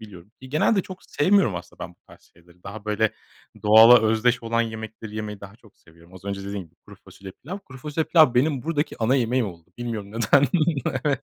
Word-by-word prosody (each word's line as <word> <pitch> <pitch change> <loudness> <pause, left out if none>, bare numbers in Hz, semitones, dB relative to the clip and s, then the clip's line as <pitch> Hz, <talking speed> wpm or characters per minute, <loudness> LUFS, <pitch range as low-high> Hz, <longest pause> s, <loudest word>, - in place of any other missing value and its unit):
biliyorum. 105 -2 -13
İii, 130 - -11
genelde 185 +7 +2
çok 185 -1 -11
sevmiyorum 180 - +2
aslında 90 - -11
ben - - -9
bu - - -22
tarz - - -18
şeyleri. 85 +1 -24
Daha 100 +2 -9
böyle 105 +1 0 0.5
doğala 110 +3 +8
özdeş 110 +3 +1
olan 115 0 0
yemekleri 110 -1 -8
yemeyi 105 -2 -6
daha 100 +2 -12
çok 110 -3 -23
seviyorum. 85 +2 -21
Az 95 +1 -14
önce 100 -1 -5
dediğim 100 -1 -5
gibi; 80 - -31
kuru - - -14
fasulye, 95 -1 -12
pilav. 180 +7 -6
Kuru 130 -10 -14
fasulye, 150 +4 -3
pilav 155 -8 +4
benim 135 +1 +1
buradaki 155 -2 -2
ana 120 +4 +2
yemeğim 125 -1 0
oldu. 85 -2 -11
Bilmiyorum, 110 -4 -5
neden. 115 +5 +3 0.6
Evet. 140 -3 0
110 Hz, 205 wpm, -23 LUFS, 100-130 Hz, 0.6 s, doğala